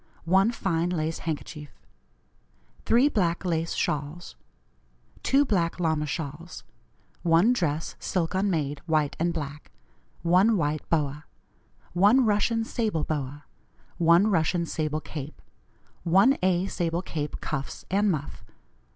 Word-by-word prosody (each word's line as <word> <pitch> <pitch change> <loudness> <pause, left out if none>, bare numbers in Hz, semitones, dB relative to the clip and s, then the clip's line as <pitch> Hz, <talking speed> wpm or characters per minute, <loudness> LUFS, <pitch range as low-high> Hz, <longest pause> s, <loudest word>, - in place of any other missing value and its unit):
1 190 +5 +4
Fine 175 -7 -1
lace 160 -2 -2
handkerchief. 150 -3 -6 1.1
3 240 +5 +5
Black 180 -7 0
lace 165 -1 -1
shawls. 150 - -3 0.9
2 280 +2 +3
Black 180 -8 0
lama 160 -3 0
shawls. 160 +2 -6 0.6
1 175 +7 +4
Dress, 160 -8 -2
silk 175 -3 -1
unmade, 165 -7 0
white 155 -3 +1
and 170 +1 +1
black. 150 -3 -6 0.5
1 185 +6 +4
White 150 -2 -2
boa. 150 -2 -1 0.7
1 205 +9 +5
Russian 220 +2 +2
sable 215 -9 -1
boa. 145 -1 -4 0.5
1 170 +5 +5
Russian 170 0 +1
sable 155 -1 -2
cape. 150 -1 -8 0.6
1 195 +11 +4
A. 185 0 +2
sable 175 -2 -2
cape, 150 -5 -4
cuffs 140 -3 -5
and 200 +2 +3
muff. 150 -5 -3
170 Hz, 115 wpm, -26 LUFS, 150-190 Hz, 1.1 s, 3